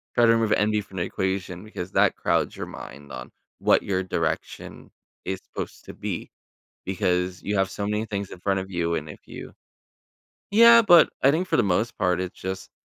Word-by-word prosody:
Try 120 - +5
to 115 - +6
remove 115 -2 +1
envy 105 0 +2
from 95 -1 -12
the 85 - 0
equation 95 -1 -3
because 95 -4 -7
that - - +3
crowds - - 0
your - - -5
mind 70 +2 -10
on 60 -1 -8 0.3
what - - +3
your 95 -1 -1
direction 80 -3 -4 0.3
is 95 0 -3
supposed - - -8
to - - -9
be - - -5 0.6
because 90 -1 -1
you 100 0 -1
have 95 0 +2
so 100 - -4
many 105 +2 -1
things 100 -2 -4
in 90 - -9
front 95 0 0
of 95 +1 -7
you. 85 -1 -1
and 75 0 -4
if - - -10
you - - -9 1.0
Yeah, 230 +2 +8
but 175 -6 +7
I 135 - +6
think 175 +5 0
for - - +2
the 120 - +4
most 105 +6 0
part, 90 -2 +1
it's 90 -1 -5
just 95 0 -5
95 Hz, 200 wpm, -25 LUFS, 90-110 Hz, 1.0 s, Yeah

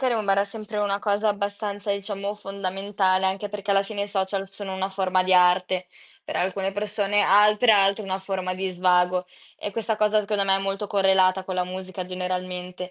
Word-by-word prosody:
rimarrà 210 -6 +2
sempre 210 +1 -6
una 200 -1 0
cosa 210 +1 0
abbastanza, 205 0 -2
diciamo, 200 0 -4
fondamentale, 195 -1 -1
anche 195 +2 -2
perché 205 0 -5
alla 195 0 +4
fine 200 0 -4
i 205 - -4
social 195 0 -2
sono 195 -1 -7
una 190 +1 -2
forma 185 -1 +1
di 185 0 +1
arte, 180 0 +3 0.4
per - - -5
alcune 190 +1 -1
persone, 205 0 0
altre 210 +4 +5
altre 200 0 +4
una 190 -1 -2
forma 190 -1 -3
di 190 +1 -2
svago. 180 0 +2 0.3
E 205 - -5
questa 220 +1 -2
cosa 215 0 +3
secondo 205 -1 -1
me 195 0 +3
è - - -1
molto 195 +1 -3
correlata 190 -1 +3
con 185 - -4
la 180 - 0
musica 185 0 -6
generalmente. 180 0 -4
195 Hz, 180 wpm, -24 LUFS, 185-205 Hz, 0.4 s, altre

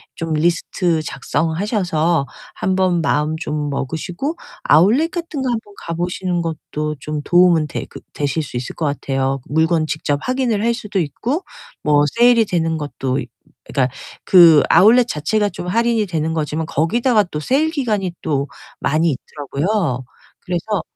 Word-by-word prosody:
좀 165 -1 -3
리스트 170 +1 +1
작성하셔서 165 - -1 0.3
한번 185 -2 +1
마음 150 0 0
좀 150 -2 -3
먹으시고 170 - -3 0.3
아웃렛 220 - +4
같은 335 -5 -4
거 260 - -1
한번 220 -3 -4
가 170 - -4
보시는 180 0 -2
것도 150 -1 -4
좀 150 +1 -4
도움은 175 -3 +4
돼 - - -5
그 - - -10
되실 145 +2 -1
수 135 - -10
있을 120 0 -4
것 160 - -2
같아요. 135 -1 -1
물건 160 +1 +2
직접 145 -2 -1
확인을 255 -5 0
할 235 +1 +2
수도 210 -4 -3
있고 240 - -2 0.4
뭐 145 -1 +3
세일이 240 -2 +5
되는 165 -3 0
것도 135 -3 -3
있 125 -2 -6 0.4
그니까 130 -2 0 0.4
그 165 -5 +8
아웃렛 235 +4 +6
자체가 205 +5 0
좀 180 - -7
할인이 230 +2 +1
되는 160 -3 -2
거지만 155 0 -2
거기다가 210 - +2
또 155 -5 -6
세일 285 - +1
기간이 215 - -1
또 140 -3 -1 0.3
많이 155 +2 +2
있더라고요. 145 - -2 0.4
그래서 180 +2 -2
170 Hz, 310 characters per minute, -19 LUFS, 150-210 Hz, 0.4 s, 그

